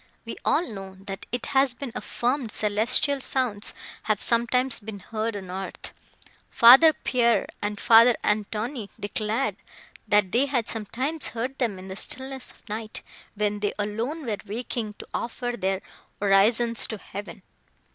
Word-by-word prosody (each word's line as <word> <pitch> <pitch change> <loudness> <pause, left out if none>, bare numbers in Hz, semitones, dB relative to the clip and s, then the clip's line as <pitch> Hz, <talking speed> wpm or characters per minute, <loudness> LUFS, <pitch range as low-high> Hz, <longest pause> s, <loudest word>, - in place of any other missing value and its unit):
We - - -6
all 325 +4 +2
know, 195 -4 -8
that 195 -1 -7
it 245 0 -3
has 270 -2 +2
been 275 -2 -6
affirmed 245 -1 -2
celestial 235 +8 +3
sounds 245 -6 -1 0.3
have 215 -2 0
sometimes 240 +2 +2
been 215 -1 -8
heard 220 +3 -4
on 190 -2 -8
earth. 190 +1 -7 0.6
Father 265 +7 +8
Pierre 235 -7 +1 0.2
and 205 0 -3
Father 230 +1 +6
Antoine 215 +2 -2
declared, 215 +5 -2 0.5
that 205 -3 +3
they 260 +4 +2
had 250 -5 -1
sometimes 255 +8 -2
heard 245 +4 -4
them 230 -7 -1
in 185 +1 -10
the 190 - -7
stillness 265 +4 -2
of - - -14
night, 215 +1 -6 0.3
when 210 0 -1
they 205 0 -1
alone 230 +9 -3
were 215 -3 -2
waking 220 0 -4
to - - -11
offer 245 +1 -3
their 190 -3 -2 0.4
orisons 220 +4 +4
to 220 - -5
heaven. 195 -2 -9
225 Hz, 145 wpm, -25 LUFS, 205-250 Hz, 0.6 s, Father